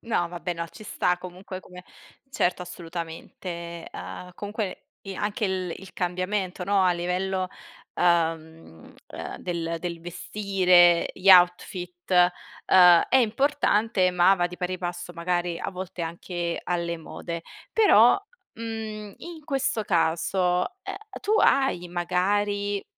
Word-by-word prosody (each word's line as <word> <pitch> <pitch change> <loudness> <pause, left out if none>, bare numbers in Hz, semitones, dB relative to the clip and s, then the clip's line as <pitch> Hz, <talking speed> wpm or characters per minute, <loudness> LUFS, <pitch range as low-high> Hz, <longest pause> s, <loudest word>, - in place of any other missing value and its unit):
No, 220 -7 0
vabbè, 175 +1 -4
no, 170 0 -4
ci 215 - -13
sta 180 -3 0
comunque 185 +1 -8
come 180 -1 -13 0.5
certo, 180 -8 0
assolutamente. 170 0 -7
Uhm, 180 0 -8
comunque 205 -1 -5 0.2
i 195 -1 -7
anche 210 +2 -2
il 185 -3 -1
il 190 -1 -13
cambiamento, 185 +1 -2
no, 200 0 +3
a 185 - +4
livello, 185 +2 -1 0.5
uhm, 165 - -1
uhm, - - -7
del 170 -2 -3
del 170 0 -5
vestire, 180 -1 +3
gli 190 +1 +3
outfit, 180 0 +3 0.6
uhm, 180 -2 +7
è - - +4
importante, 225 -5 +2
ma 180 +2 +5
va 175 -2 +1
di 180 - -9
pari 180 +1 -2
passo 175 0 -5
magari 175 0 -1
a - - -4
volte 185 -1 -6
anche 170 +1 -4
alle 170 -1 -1
mode. 170 +1 -7 0.3
Però, 380 - +6 0.3
mhmm, 220 -2 -6
in 335 -3 -10
questo 270 -6 -1
caso, 170 +1 +1 0.5
uhm, 390 0 -5 0.2
tu 415 - -1
hai 265 -10 +3
magari 200 +3 0
180 Hz, 130 wpm, -26 LUFS, 175-200 Hz, 0.6 s, uhm